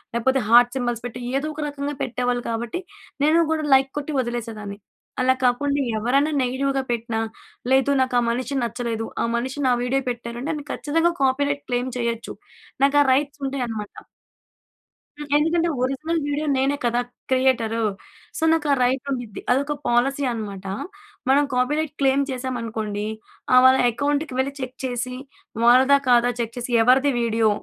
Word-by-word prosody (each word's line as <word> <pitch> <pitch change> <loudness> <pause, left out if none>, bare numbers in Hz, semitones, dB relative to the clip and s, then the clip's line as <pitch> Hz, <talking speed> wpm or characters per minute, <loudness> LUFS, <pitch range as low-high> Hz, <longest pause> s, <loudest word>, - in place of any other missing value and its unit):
లేపోతే, 260 +3 +2
heart 240 +1 +7
symbols 240 -3 -2
పెట్టి 245 0 -6 0.2
ఏదో 300 - -4
ఒక 300 - -6
రకంగా 285 0 -4
పెట్టేవాళ్ళు 245 0 -1
కాబట్టి, 235 +7 -3 0.4
నేను 320 +3 +5
కూడా 315 -1 0
లైక్ 265 0 +4
కొట్టి 295 +1 -5
వదిలేసేదాన్ని. 225 -4 -4 0.5
అలా 260 0 +4
కాకుండా, 280 +3 +1 0.2
ఎవరైనా 275 +7 +2
నెగెటివ్‌గా 270 +2 -1
పెట్టిన 230 -1 -2 0.6
లేదు 270 +1 +3
నాకా 250 -1 +1
మనిషి 255 +4 -2
నచ్చలేదు. 235 -1 -3 0.2
ఆ - - +1
మనిషి 260 +4 -4
నా 250 - +4
వీడియో 270 +2 0
పెట్టారంటే, 240 +4 -5
నేను 290 - -8
ఖచ్చితంగా 330 +3 +1
కాపీరైట్ 285 +2 +1
క్లెయిమ్ 245 +1 -1
చేయొచ్చు. 235 -1 -3 0.5
నాకు 280 +1 +4
ఆ - - -5
రైట్స్ 285 +1 -1
ఉంటాయనమాట. 235 -6 -4 1.1
హ్మ్. 295 0 -7
ఎందుకంటే, 330 +2 +2
ఒరిజినల్ 310 +6 -1
వీడియో 290 +1 -1
నేనే 275 +2 +1
కదా 240 +1 +2 0.3
క్రియేటరు. 235 -4 +2 0.5
సో, - - -3
నాకా 305 -3 +1
రైట్ 255 +1 +1
ఉండిద్ది. 245 -5 -5
అదొక 280 +3 0
పాలసీ 270 +4 +2
అనమాట. 200 -4 -6 0.6
మనం 280 +2 +5
కాపీరైట్ 295 +5 0
క్లైమ్ 275 +1 +3
చేశామనుకోండి, 230 -5 -3 0.5
ఆహ్, 255 - +8
వాళ్ళ 260 0 +7
అకౌంట్‌కి 285 +3 -1
వెళ్లి 275 +1 0
చెక్ 255 -1 -5
చేసి 250 0 -3 0.5
వాళ్లదా 260 +4 +6
కాదా 245 0 +5
చెక్ 230 -1 -3
చేసి 245 0 -4
ఎవరిది 265 +4 +4
వీడియో 225 -1 +2
255 Hz, 145 wpm, -23 LUFS, 235-280 Hz, 1.1 s, ఆహ్